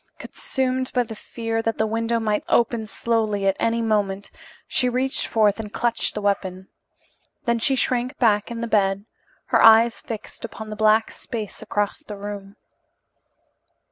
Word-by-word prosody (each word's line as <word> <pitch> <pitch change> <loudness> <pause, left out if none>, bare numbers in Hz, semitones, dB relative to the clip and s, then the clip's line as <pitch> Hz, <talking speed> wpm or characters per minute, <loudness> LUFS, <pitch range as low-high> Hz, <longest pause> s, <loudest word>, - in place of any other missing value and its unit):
Consumed 260 -1 -2
by 250 - +3
the 225 -1 -8
fear 225 +1 -3
that 225 -1 -1
the 220 - +2
window 230 +1 0
might 215 -2 0
open 230 -2 +2
slowly 215 -3 0
at 195 0 +3
any 230 0 +1
moment, 205 -3 0 0.4
she 250 - +1
reached 255 +2 0
forth 215 -2 +2
and 210 -2 -6
clutched 235 +3 0
the 210 - -3
weapon. 190 -2 -2 0.8
Then 235 -1 +1
she 270 +4 +2
shrank 250 +1 0
back 210 -4 +2
in 235 -1 -5
the 235 - -2
bed, 200 -2 +1 0.4
her - - +4
eyes 225 +1 +7
fixed 220 -2 -8
upon 220 -1 -7
the - - -4
black 220 +1 +3
space 220 -4 -6
across 205 -1 -1
the 210 - -9
room. 200 0 -7
220 Hz, 160 wpm, -23 LUFS, 205-235 Hz, 0.8 s, eyes